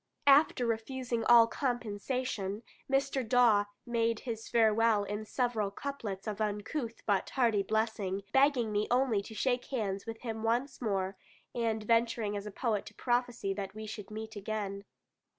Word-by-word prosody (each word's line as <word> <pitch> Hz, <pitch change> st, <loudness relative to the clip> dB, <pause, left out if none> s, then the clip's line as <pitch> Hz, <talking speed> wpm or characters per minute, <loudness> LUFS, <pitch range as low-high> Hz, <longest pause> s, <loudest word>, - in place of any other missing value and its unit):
After 280 Hz, -3 st, +5 dB
refusing 235 Hz, +1 st, -2 dB
all 235 Hz, -1 st, +8 dB
compensation, 230 Hz, -3 st, -2 dB, 0.3 s
Mr. 270 Hz, -1 st, +1 dB
Dawe 225 Hz, -3 st, +4 dB, 0.2 s
made 230 Hz, -2 st, 0 dB
his 225 Hz, -3 st, -5 dB
farewell 225 Hz, -2 st, +4 dB
in 210 Hz, +1 st, -4 dB
several 230 Hz, -3 st, 0 dB
couplets 205 Hz, -4 st, -5 dB
of 215 Hz, 0 st, -4 dB
uncouth 220 Hz, +4 st, -3 dB
but 200 Hz, -2 st, +1 dB
hearty 230 Hz, -6 st, +2 dB
blessing, 205 Hz, -2 st, -1 dB
begging 270 Hz, -5 st, +4 dB
me 210 Hz, 0 st, 0 dB
only 245 Hz, -4 st, +2 dB
to 220 Hz, +2 st, -10 dB
shake 245 Hz, +1 st, 0 dB
hands 205 Hz, -6 st, -3 dB
with 225 Hz, 0 st, -6 dB
him 225 Hz, -2 st, -4 dB
once, 245 Hz, +5 st, 0 dB, 0.7 s
and 225 Hz, -2 st, -1 dB
venturing 230 Hz, -1 st, +1 dB
as 205 Hz, +1 st, -4 dB
a -, -, -5 dB
poet 215 Hz, -1 st, -1 dB
to 215 Hz, -, -12 dB
prophesy 240 Hz, -5 st, 0 dB
that 195 Hz, 0 st, -5 dB
we 215 Hz, 0 st, -6 dB
should 210 Hz, -2 st, -7 dB
meet 220 Hz, +1 st, -7 dB
again. 200 Hz, -1 st, -4 dB
225 Hz, 150 wpm, -31 LUFS, 210-245 Hz, 0.7 s, all